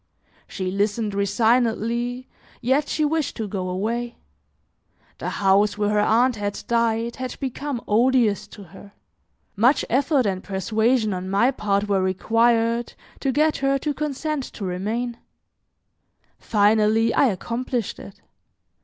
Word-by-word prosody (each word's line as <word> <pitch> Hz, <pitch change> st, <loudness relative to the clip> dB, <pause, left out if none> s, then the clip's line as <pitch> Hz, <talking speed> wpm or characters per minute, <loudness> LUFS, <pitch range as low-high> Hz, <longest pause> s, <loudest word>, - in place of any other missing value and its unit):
She 185 Hz, -2 st, -4 dB
listened 205 Hz, +2 st, -1 dB
resignedly, 235 Hz, +4 st, 0 dB, 0.3 s
yet 275 Hz, +4 st, +1 dB
she 305 Hz, -, +1 dB
wished 310 Hz, -1 st, -1 dB
to 220 Hz, -3 st, -3 dB
go 185 Hz, -2 st, -4 dB
away; 230 Hz, +6 st, -2 dB, 1.0 s
the -, -, -3 dB
house 200 Hz, +1 st, +2 dB
where 210 Hz, 0 st, 0 dB
her 210 Hz, -, +2 dB
aunt 235 Hz, +3 st, +3 dB
had 205 Hz, -1 st, -4 dB
died 230 Hz, 0 st, 0 dB
had 255 Hz, -1 st, -5 dB
become 270 Hz, -1 st, -4 dB
odious 230 Hz, -1 st, +2 dB
to 205 Hz, -, -12 dB
her, 200 Hz, +3 st, -14 dB, 0.6 s
much 240 Hz, +8 st, +3 dB
effort 270 Hz, +1 st, +2 dB
and 190 Hz, -2 st, -2 dB
persuasion 215 Hz, +3 st, 0 dB
on 185 Hz, 0 st, -5 dB
my 200 Hz, +7 st, +3 dB
part 205 Hz, -5 st, -1 dB
were 195 Hz, -2 st, +1 dB
required 230 Hz, +5 st, +1 dB, 0.2 s
to 270 Hz, -, 0 dB
get 305 Hz, +3 st, +2 dB
her 275 Hz, 0 st, +1 dB
to 295 Hz, +2 st, -2 dB
consent 300 Hz, 0 st, -3 dB
to 200 Hz, -, -6 dB
remain; 220 Hz, +7 st, -3 dB, 1.2 s
finally, 215 Hz, +1 st, +3 dB
I 275 Hz, -, +4 dB
accomplished 235 Hz, +2 st, -3 dB
it. 195 Hz, -, -12 dB
230 Hz, 130 wpm, -23 LUFS, 205-255 Hz, 1.2 s, I